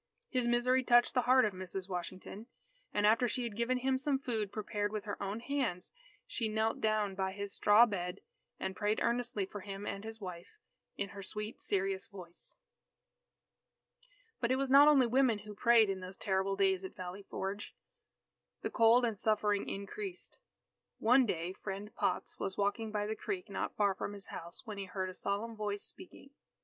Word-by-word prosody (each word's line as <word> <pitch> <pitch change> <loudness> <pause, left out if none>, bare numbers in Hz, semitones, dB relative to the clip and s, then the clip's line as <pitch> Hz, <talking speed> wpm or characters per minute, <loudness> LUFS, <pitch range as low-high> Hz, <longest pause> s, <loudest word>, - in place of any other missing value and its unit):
His 250 -2 0
misery 250 +2 +3
touched 240 -1 +5
the 250 - +3
heart 255 -1 +7
of 210 - -1
Mrs. 185 0 -6
Washington, 185 +4 -6 0.4
and 205 0 +1
after 230 +4 +5
she 250 +1 -1
had 230 -3 -4
given 235 +3 +1
him 260 +1 +1
some 275 0 +2
food 225 -7 -2
prepared 205 -1 -2
with 215 -2 -3
her 205 -2 -5
own 200 +3 -3
hands, 255 - -2 0.3
she 230 - -2
knelt 220 +1 0
down 215 -2 +1
by 190 0 -2
his 200 0 -5
straw 210 +3 +6
bed, 180 -5 -3 0.4
and 190 - -3
prayed 210 0 0
earnestly 235 -4 0
for 205 +2 -8
him 195 +1 -6
and 200 0 -4
his 225 0 -7
wife, 180 - -8 0.4
in 200 - -2
her 200 0 -8
sweet 210 +3 -5
serious 195 -1 -1
voice. 195 - -11 1.8
But 235 - 0
it - - +4
was 270 0 -1
not 280 +2 +9
only 280 -4 +6
women 245 -1 +3
who 210 - -7
prayed 230 +1 +5
in 195 -1 -2
those 185 +1 -8
terrible 190 0 0
days 195 -1 +2
at 190 - -7
Valley 185 +2 -6
Forge. 195 +1 -5 0.9
The - - -2
cold 235 +1 +5
and 220 -4 -1
suffering 210 -2 +1
increased. 360 - -6 0.6
One 250 +3 +5
day 175 -1 -2
Friend 200 +2 -6
Potts - - -1
was 190 - -3
walking 205 +2 0
by 210 -1 -1
the 215 +1 -2
creek 370 - -4
not - - -3
far 205 -2 +3
from 205 - -5
his 200 -1 -5
house, 170 +7 -7
when 210 -3 -6
he 195 - -3
heard 185 0 -3
a - - -12
solemn 205 +5 -2
voice 205 -1 -3
speaking. 350 -6 -8
210 Hz, 185 wpm, -33 LUFS, 195-240 Hz, 1.8 s, not